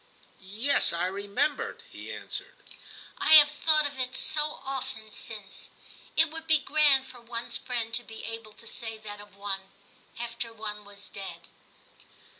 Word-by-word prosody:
* - - -25
Yes, 215 +9 +2
I 170 +1 0
remember,' 200 +9 -1
he - - -8
answered. - - -5 0.3
' - - -16
I - - +4
have 295 -1 +10
thought 305 0 +4
of 280 -2 -4
it 255 +1 -2
so 300 +2 +3
often 260 -5 -5
since. 210 -2 -1 0.5
It 320 -1 +5
would 320 0 -8
be 315 -1 +7
grand 290 -2 +4
for 250 -2 -13
one's 235 0 -3
friend 235 -3 -3
to 240 +1 +2
be 225 -1 -8
able 225 -1 -6
to 230 - -13
say 225 -1 -1
that 205 -1 -8
of 205 -1 -16
one, 195 -1 -5 0.5
after 235 0 -4
one 210 -2 -6
was 200 0 -5
dead. 195 -1 -8
230 Hz, 165 wpm, -28 LUFS, 205-275 Hz, 0.5 s, have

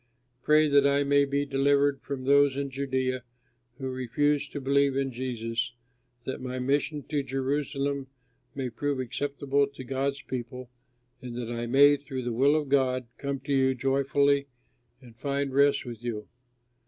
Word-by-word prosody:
Pray 155 +3 +4
that 140 -1 +5
I 140 0 +3
may 140 0 +3
be 140 +1 -1
delivered 140 0 +2
from 140 -2 -5
those 140 0 +4
in 140 -1 -3
Judea 130 -1 -1 0.6
who 130 -1 -4
refuse 135 +4 0
to 145 - -6
believe 140 0 +2
in 135 -1 0
Jesus, 120 -1 -3 0.5
that 130 - -5
my 130 0 -4
mission 145 +3 0
to 145 +1 -1
Jerusalem 140 +1 -2 0.5
may 130 -3 -3
prove 145 +3 -2
acceptable 140 +2 0
to 140 -2 -10
God's 135 +2 -2
people, 125 0 -6 0.5
and 125 -2 -7
that 120 -1 -4
I 120 0 -3
may 145 +3 +6
through 135 -2 -6
the 120 -1 -2
will 140 +5 +4
of 150 -2 0
God 130 -2 +2
come 140 -1 -3
to 140 +2 -2
you 130 -1 +3
joyfully 140 +2 +2 0.5
and 120 -3 -15
find 140 +2 -2
rest 140 0 +3
with 120 -1 -8
you. 110 -3 -4
135 Hz, 160 wpm, -28 LUFS, 130-140 Hz, 0.6 s, may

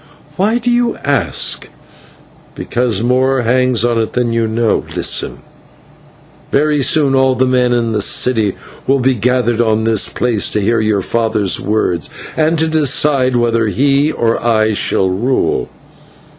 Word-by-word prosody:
"Why 210 +7 +1
do 245 0 -1
you 240 -1 +1
ask?" 115 - 0 0.9
"Because 115 -4 -1
more 130 +2 +1
hangs 125 -1 +1
on 120 -1 0
it 110 - -3
than 120 -2 -1
you 115 -1 0
know. 110 0 0
Listen: - - -1 1.1
Very 150 0 +1
soon 140 0 +2
all 130 -1 +2
the 130 +2 +1
men 125 -1 +1
in 120 -2 0
the 105 -1 -1
city 110 -2 +1 0.3
will 135 - +3
be 130 +1 +2
gathered 120 0 0
on 110 -1 +1
this 110 -2 +1
place 115 -5 -1
to - - -2
hear 115 +3 +1
your 110 -2 0
father's 110 -2 -1
words, 95 -6 -2 0.3
and 160 +1 +1
to 160 +1 +1
decide 145 -4 +1
whether 115 -2 +1
he 140 +6 +1
or 115 -1 -1
I 110 -2 +1
shall 95 -1 0
rule. 115 +8 -1
120 Hz, 150 wpm, -14 LUFS, 110-135 Hz, 1.1 s, will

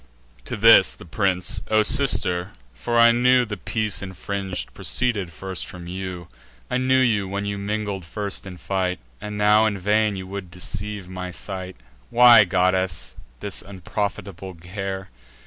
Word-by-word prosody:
To - - -4
this, - - +7
the - - -13
prince: 90 0 0
"O 110 0 +4
sister—for 90 - 0
I 115 0 +7
knew 125 +1 +4
The 105 -2 -5
peace 110 -1 -2
infring'd 95 0 -5
proceeded 105 -8 0
first 95 +2 -5
from 90 -1 -10
you; 90 -1 -6 0.4
I 125 - +2
knew 130 +1 +3
you, 110 -6 +2
when 100 +1 -3
you 100 0 -3
mingled 100 -1 -3
first 100 +3 -4
in 90 -1 -8
fight; 90 -1 -1 0.2
And 105 0 -5
now 105 +1 +5
in 100 -2 -2
vain 105 +2 +1
you 95 -1 -6
would 95 -1 -7
deceive 100 +2 -5
my 90 0 -6
sight— 95 0 -7 0.3
Why, 120 -3 +8
goddess, 95 -1 0 0.3
this - - -5
unprofitable 95 0 -5
care? 95 +3 -6
100 Hz, 145 wpm, -23 LUFS, 90-105 Hz, 0.4 s, Why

